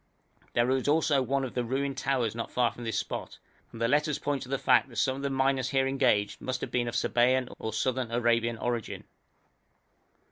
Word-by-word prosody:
There 120 +2 +2
is 130 0 0
also 150 -2 +3
one 135 +1 0
of 130 - -4
the 125 - -1
ruined 135 +3 -2
towers 125 -5 0
not 115 0 -4
far 120 -2 +1
from 120 - -9
this 115 -2 -1
spot, - - -4 0.3
and 115 - -10
the 115 - +2
letters 150 +3 +2
point 145 -1 -2
to 125 - -8
the 135 - 0
fact 125 +1 +3
that 120 - -13
some 130 +1 +1
of - - -6
the 140 - -1
miners 135 -1 +1
here 135 0 +2
engaged 130 -7 +1
must 130 0 -3
have - - -4
been 120 -1 0
of 120 - -4
Sabæan 125 +1 +2
or 110 - -3
Southern 130 +2 -1
Arabian 115 0 +1
origin. 120 -1 -3
130 Hz, 210 wpm, -29 LUFS, 120-135 Hz, 0.3 s, also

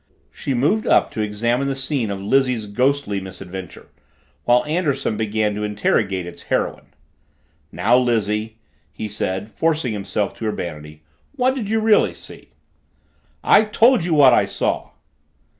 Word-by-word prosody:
She 135 - -3
moved 155 - +1
up - - +3
to 110 - -3
examine 120 +5 -1
the 135 - -1
scene 135 -4 -2
of 100 -1 -4
Lizzie's 125 +2 +1
ghostly 125 -1 0
misadventure, 95 -1 -9 0.6
while 120 +2 +3
Anderson 150 -7 -1
began 110 0 -1
to 105 +1 -4
interrogate 105 -2 0
its 85 - -10
heroine. - - -2 0.8
"Now, 120 +3 +3
Lizzie," 110 -2 -1 0.3
he 110 - -6
said, 100 -1 -3
forcing 155 -7 0
himself 100 0 -2
to 110 - -3
urbanity, 75 -6 -6 0.3
"what 260 -1 +2
did 235 -7 -4
you 225 +1 +1
really 220 -1 +3
see?" - - -12 0.9
"I - - +6
told 225 0 +4
you 170 -2 0
what 135 -4 +7
I - - +4
saw." - - -2
115 Hz, 140 wpm, -21 LUFS, 105-140 Hz, 0.9 s, what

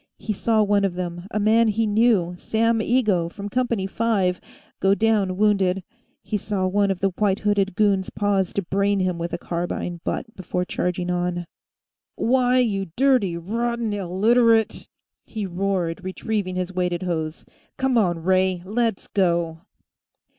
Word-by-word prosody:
He 215 - -3
saw 220 +2 +2
one 205 -1 +2
of 190 -3 0
them, 175 0 -5
a 210 - -2
man 225 +2 +4
he 220 +1 +1
knew, 210 -5 +2
Sam 230 +1 +1
Igoe, 215 -7 +1
from 205 +1 -7
Company 235 -4 0
5, 195 -3 0 0.4
go 195 +1 +3
down 200 -3 +1
wounded; 195 -3 +2 0.4
he 215 - -2
saw 200 -1 -2
one 200 +2 +2
of 190 -2 -2
the 195 -1 +2
white 200 -2 +1
hooded 200 -3 +1
goons 200 -2 +2
pause 200 -3 0
to 200 - -1
brain 200 +3 +1
him 180 -2 -1
with 170 +1 -3
a - - -2
carbine 175 0 -4
butt 225 -3 -4
before 180 -1 -3
charging 180 0 -2
on. 175 0 -1 0.7
"Why, 250 +1 +2
you 205 -6 +1
dirty 250 -10 +2
rotten 230 +4 -2
Illiterate 220 +4 +2 0.2
!" - - -60
he 215 -3 -5
roared, 180 -2 -2
retrieving 185 0 -3
his 185 0 -3
weighted 180 -1 -1
hose. 160 -3 -3 0.3
"Come 265 -1 +1
on, 175 -7 +1
Ray; 185 -1 +2
let's 225 +1 -1
go!" 170 -4 0
195 Hz, 155 wpm, -23 LUFS, 180-220 Hz, 0.7 s, man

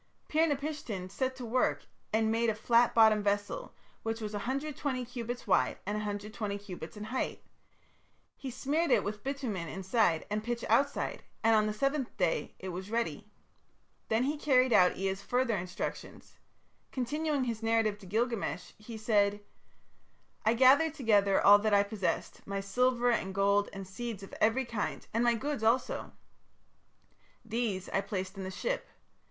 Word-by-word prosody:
Pir 320 +2 +3
napishtim 280 -10 -3
set 260 +5 -1
to 255 -2 -7
work 245 +2 +1 0.3
and 220 0 +2
made 230 +1 +2
a 220 - 0
flat 235 +2 +3
bottomed 220 -2 +6
vessel, 205 - -2 0.3
which 225 0 -3
was 215 -1 -5
120 265 +3 -2
cubits 245 0 -5
wide 195 - +2
and 205 +2 -2
120 210 0 -3
cubits 190 -2 -9
in 210 - -6
height. 235 +5 -3 0.9
He 270 - -6
smeared 290 +7 0
it - - +4
with 205 0 -5
bitumen 250 -11 -3
inside 190 -2 +1
and 210 0 -1
pitch 235 0 -3
outside; 275 +6 +1 0.2
and 225 0 +5
on 215 0 +3
the - - 0
seventh 275 +4 -1
day 180 -4 0
it 190 - -6
was 185 +2 -6
ready. 230 +1 -2 0.8
Then 225 +2 +2
he 290 +3 0
carried 255 -4 +4
out 180 -3 +5
Ea's 195 +1 -2
further 245 -1 +1
instructions. 180 -1 -6 0.5
Continuing 290 +2 -1
his 230 -3 -3
narrative 225 -2 +1
to 195 - -12
Gilgamesh, 215 - -1
he 220 +1 -8
said: 205 -2 +2 1.0
"I 220 +2 +3
gathered 280 +6 +5
together 205 -8 +3
all 205 +1 +9
that 215 0 +2
I 200 - +5
possessed, 200 -5 -2
my 200 0 -2
silver 245 +4 +2
and 190 -5 -1
gold 200 +1 +3
and 195 -1 -7
seeds 215 +1 -6
of 195 - -11
every 235 +5 +3
kind, 230 -3 -3
and 230 +2 +2
my 240 -1 +4
goods 280 +2 -3
also. 230 +3 +1 1.3
These 220 -5 -2
I 195 - +1
placed 190 -1 -4
in 195 - -6
the 190 - -4
ship. - - -3
220 Hz, 160 wpm, -31 LUFS, 200-250 Hz, 1.3 s, all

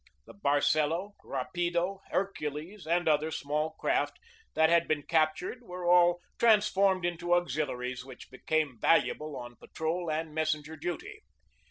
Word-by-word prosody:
The - - -13
Barcelo, 155 +3 +1
Rapido, 175 +2 -2
Hercules, 170 -1 -3
and 175 +1 +1
other 155 0 +3
small 150 +1 -2
craft 345 - 0 0.4
that 160 0 +5
had 170 0 +4
been 150 -2 0
captured 160 - 0
were 180 -6 -7
all 175 0 +5 0.2
trans 215 -3 +5
formed 190 -3 +2
into 175 0 +1
auxiliaries 130 -7 -2
which 130 -1 -12
became 140 -1 -1
valuable 150 +1 +2
on 120 -1 -9
patrol 165 +2 -3
and 155 0 -2
messenger 155 0 -1
duty. 175 - -5
160 Hz, 135 wpm, -30 LUFS, 150-180 Hz, 0.4 s, that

